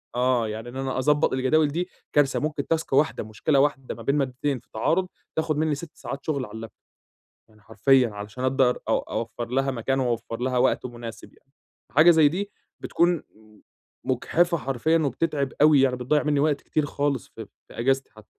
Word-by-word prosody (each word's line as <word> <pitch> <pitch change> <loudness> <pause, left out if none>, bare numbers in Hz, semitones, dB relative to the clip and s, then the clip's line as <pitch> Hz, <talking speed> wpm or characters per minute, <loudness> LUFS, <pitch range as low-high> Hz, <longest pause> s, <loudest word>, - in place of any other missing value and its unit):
آه، 125 -2 +2
يعني 110 +2 -6
إن 120 - -11
أنا 135 -1 -2
أضبط 150 +3 +2
الجداول 140 +4 +3
دي 175 +5 -3 0.2
كارثة 145 -2 +3
ممكن 150 -2 -3
تاسك 165 -4 -1
واحدة 145 -2 +2
مشكلة 115 +7 0
واحدة 135 -2 0
ما - - -11
بين 140 - +1
مادتين 135 0 -1
في - - -30
تعارض 165 +12 +1 0.3
تاخد 160 -1 0
مني 155 -1 +1
6 165 +2 -9
ساعات 140 0 -7
شغل 140 -5 -1
على - - -13
اللاب 115 0 -7 0.6
توب - - -38
يعني 110 -1 -23
حرفيًا 120 +3 +3
عشان 105 +4 -7
أقدر 130 -1 +2
اوفر 115 +1 -2
لها 135 +2 0
مكان 135 +2 -1
و 130 - +1
واوفر 115 0 -3
لها 125 0 0
وقت 125 0 +2
مناسب 120 -2 -9
يعني، - - -29 0.4
حاجة 155 +5 +7
زي 160 -3 +6
دي 195 +6 -4 0.3
بتكون 175 +1 +2 0.2
م 110 -1 -21 0.4
مجحفة 170 +7 +1
حرفيًا، 135 +5 +1
وبتتعِب 140 -1 -1
أوي، 150 -2 +7
يعني 130 -2 +3
بتضيّع 130 +5 +1
مني 150 -2 +1
وقت 145 -1 +1
كتير 150 -2 -1
خالص 140 -6 -2
في - - -10 0.2
في - - -14
أجازتي 135 +3 +1
حتى. 110 -1 -16
135 Hz, 190 wpm, -25 LUFS, 120-150 Hz, 0.6 s, حاجة